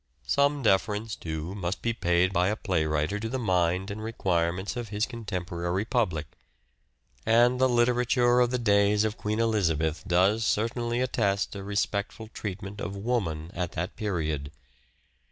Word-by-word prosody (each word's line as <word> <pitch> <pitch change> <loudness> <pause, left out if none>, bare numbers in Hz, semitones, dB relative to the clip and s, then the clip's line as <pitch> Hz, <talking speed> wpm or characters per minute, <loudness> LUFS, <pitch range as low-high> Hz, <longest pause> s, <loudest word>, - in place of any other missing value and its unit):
Some 140 - +2
deference, 105 +1 +1
too, 80 +2 -5
must 95 -2 -4
be 115 - +1
paid 90 -2 +2
by 90 0 +3
a 105 - +1
playwriter 80 -2 0
to 110 +1 -3
the 130 - -2
mind 95 -3 +1
and 110 +2 -6
require 90 -7 0
ments 95 +6 -5
of 120 -3 -5
his 105 +1 0
contemporary 90 -5 -3
public; 100 - 0 1.0
and 120 +3 +4
the 130 - +5
literature 120 0 +3
of 125 -1 +4
the 125 - 0
days 105 -2 +3
of 110 -1 -1
Queen 105 +1 -2
Elizabeth 85 -8 +1
does 95 +5 +3
certainly 120 +3 0
attest 100 -6 0
a 100 - -5
respectful 100 +2 -2
treatment 100 -1 -6
of 95 +3 -4
Woman 95 -7 -2
at 85 -1 -3
that 90 +4 -3
period. 80 -8 -2
100 Hz, 155 wpm, -27 LUFS, 90-115 Hz, 1.0 s, the